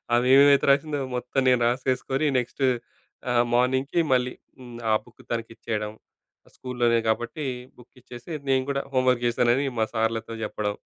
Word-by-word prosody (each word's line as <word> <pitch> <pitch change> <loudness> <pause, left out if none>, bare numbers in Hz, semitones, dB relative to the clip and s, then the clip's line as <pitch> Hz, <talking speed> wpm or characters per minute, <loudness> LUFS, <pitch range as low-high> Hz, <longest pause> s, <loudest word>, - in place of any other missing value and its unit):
అమె 120 +1 +2
ఏమేమైతే 140 0 +6
రాసిందో, 145 +1 +1 0.2
మొత్తం 125 +2 -1
నేను 125 -1 +3
రాసేసుకొని 130 +3 0
నెక్స్ట్ 125 +3 -5 0.7
ఆహ్, 120 -1 +4
మార్నింగ్‌కి 130 +6 +1
మళ్ళీ 125 0 +1 0.3
హ్మ్, 120 -2 -10
ఆ - - +4
బుక్ - - -18
తనకిచ్చేయడం, 115 -2 -4 0.6
స్కూల్‌లోనే 120 -2 0
కాబట్టి, 120 +6 -2 0.3
బుక్కిచ్చేసి 125 +3 -13 0.2
నేను 130 -1 +3
కూడా 140 0 0
హోమ్ 130 0 +2
వర్క్ 120 -1 +1
చేశానని 120 +3 +2
మా 110 - +3
సార్‌లతో 115 0 -1
చెప్పడం. 105 -1 -3
125 Hz, 140 wpm, -25 LUFS, 115-130 Hz, 0.7 s, ఏమేమైతే